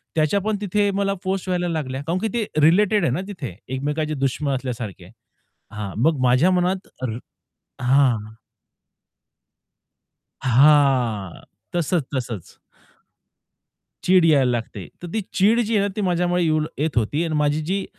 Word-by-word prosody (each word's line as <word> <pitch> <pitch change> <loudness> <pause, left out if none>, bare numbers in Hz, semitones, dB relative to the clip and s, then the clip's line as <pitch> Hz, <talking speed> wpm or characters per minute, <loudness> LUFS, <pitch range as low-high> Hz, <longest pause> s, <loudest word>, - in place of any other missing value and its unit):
त्याच्या 155 +5 +2
पण 215 +1 -1
तिथे 205 0 +1
मला 195 0 0
पोस्ट 190 0 -2
व्हायला 180 -1 0
लागल्या. 140 -4 -3
कारण 175 +3 0
की 225 - -1
ते 230 -3 0 0.2
रिलेटेड 200 +5 +4
आहे 145 - +2
ना 165 - -1
तिथे 145 - -7 0.2
एकमेकांचे 150 +3 -2
दुश्मन 135 0 -1
असल्यासारखे 120 -8 -5
आहे. 95 - -17 0.6
हां, 105 -2 -5
मग 155 -3 +2
माझ्या 130 +9 +4
मनात 185 +1 0 0.2
रा 115 -2 -2 0.7
हां. 120 -5 +2 2.0
हां, 130 - +3 0.3
तसंच, 170 -3 0
तसंच. 120 -8 -5 1.5
चीड 185 -1 +5
यायला 140 -6 +4
लागते. 115 -5 -4
तर 175 - -6
ती 220 - 0
चीड 215 +5 +4
जी 225 -1 0
आहे 200 - +2
ना, - - -1
ती - - -1
माझ्यामुळे 180 -1 +1
येऊ 155 -2 +2 0.2
येत 150 -1 -1
होती 145 +9 0
आणि 160 -2 -2
माझी 150 0 +1
जी 190 +4 -1
155 Hz, 145 wpm, -22 LUFS, 130-185 Hz, 2.0 s, चीड